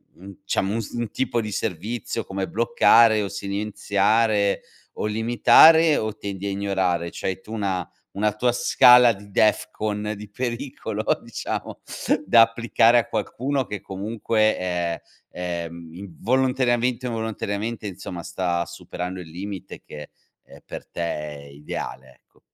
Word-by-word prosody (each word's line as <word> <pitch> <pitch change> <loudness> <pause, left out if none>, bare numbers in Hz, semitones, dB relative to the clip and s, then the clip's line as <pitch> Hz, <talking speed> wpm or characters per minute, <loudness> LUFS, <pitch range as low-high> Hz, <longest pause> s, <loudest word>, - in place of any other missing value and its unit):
u - - -21
un 100 +1 -10
diciamo, 95 +1 0
un 115 - -1
s - - -9
un 120 -2 -3
tipo 125 -3 -1
di 105 -1 -5
servizio 110 +4 -3
come 95 -1 -4
bloccare 115 -2 +4
o - - -2
silenziare, 100 +1 0 0.3
o - - -4
limitare, 120 +9 +6
o 110 -1 -2
tendi 100 -1 -6
a - - -1
ignorare? 95 -4 -1
C'hai 95 0 -4
tu 110 - -13
una 95 -5 -2 0.2
una 105 +1 0
tua 120 +3 +2
scala 125 0 +6
di 100 -1 -10
DEFCON 105 0 0
di 105 0 -10
pericolo, 120 -2 -4 0.2
diciamo, 115 -1 -5 0.5
da 115 - +7
applicare 115 +1 +4
a 115 - -2
qualcuno 130 +5 -2
che 105 -2 -6
comunque 110 +2 0
è 90 -2 -2 0.3
è, 85 -1 -4
mhmm, 85 -1 -11
in 95 -3 -10
volontariamente 125 0 +1
o - - -2
involontariamente, 110 -1 -3
insomma, 90 -2 -7
sta 85 0 -1
superando 90 +1 -6
il 85 -3 -9
limite 95 +2 -7
che, 75 -1 -10 0.3
ehm, - - -16
per - - -9
te - - -6
è 75 -3 -4
ideale, 70 -2 -8
ecco. - - -32
105 Hz, 145 wpm, -23 LUFS, 95-115 Hz, 0.5 s, da